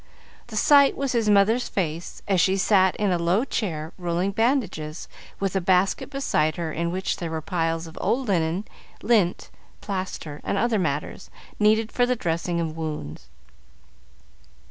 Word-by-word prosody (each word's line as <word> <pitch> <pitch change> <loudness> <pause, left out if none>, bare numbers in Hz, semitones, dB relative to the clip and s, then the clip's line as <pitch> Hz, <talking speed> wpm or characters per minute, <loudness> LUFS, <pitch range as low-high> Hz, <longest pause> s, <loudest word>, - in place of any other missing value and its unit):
The 225 - -9
sight 280 +4 +5
was 275 -2 -1
his 230 -3 +1
mother's 210 +4 +3
face, 170 -3 -3
as 190 -3 +3
she 190 0 +2
sat 190 -1 +3
in 205 -2 0
a 175 - +1
low 180 +8 +2
chair 160 - -3
rolling 175 +2 -1
bandages, 200 - -1 0.3
with 195 -1 -2
a 190 - +2
basket 185 +5 +2
beside 155 - 0
her 165 -2 -3
in 170 +2 -2
which 185 +1 -2
were 160 -2 -3
piles 165 0 -2
of 160 - -10
old 260 +1 0
linen, 175 +1 0 0.4
lint, 205 -7 +1 0.3
plaster, 185 -6 -5
and - - -1
other 230 -1 +1
matters, 145 -4 -3 0.3
needed 215 +1 +3
for 245 -1 +2
the 250 - +1
dressing 170 -3 -2
of 160 -2 -3
wounds. 150 - -6
185 Hz, 155 wpm, -24 LUFS, 165-215 Hz, 0.4 s, sight